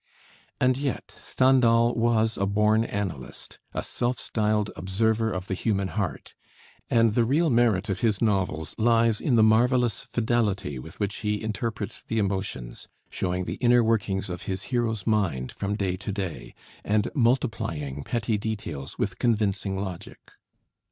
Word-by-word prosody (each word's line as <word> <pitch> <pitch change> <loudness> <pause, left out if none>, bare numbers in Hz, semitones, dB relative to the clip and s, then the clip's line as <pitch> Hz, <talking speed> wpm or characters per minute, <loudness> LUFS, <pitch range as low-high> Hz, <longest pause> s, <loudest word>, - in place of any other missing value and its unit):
And 130 0 +3
yet 140 -2 -3
Stendhal 120 -3 +3
was 115 -1 +2
a 100 - 0
born 105 +2 +3
analyst, 100 - -5
a - - -3
self 120 +1 -1
styled 105 -1 0
"observer 110 +5 0
of 90 -1 -4
the 95 - -3
human 100 -1 0
heart"; 90 -11 -4 0.6
and 115 -2 +4
the 120 - +3
real 150 +7 +2
merit 115 -5 +3
of 95 -1 -2
his 110 -4 +1
novels 95 -8 0
lies 115 -1 +3
in 130 - +2
the 110 - +6
marvelous 120 +1 +3
fidelity 110 - -1
with 80 +8 -11
which 100 -1 -1
he 105 -1 -2
interprets 110 -2 -4
the 115 - -3
emotions, 95 - -3 0.2
showing 90 0 -2
the - - -4
inner 120 -1 +5
workings 105 -4 0
of 90 -1 -5
his 95 0 -2
hero's 115 -4 0
mind 90 - 0
from 100 +1 -3
day 95 -3 -1
to 100 - -5
day, 95 - -5 0.3
and 105 0 +1
multiplying 115 - 0
petty 115 +1 -1
details 100 -11 -5
with 95 -2 -2
convincing 105 -4 0
logic. 95 -3 -7
105 Hz, 150 wpm, -26 LUFS, 95-115 Hz, 0.6 s, the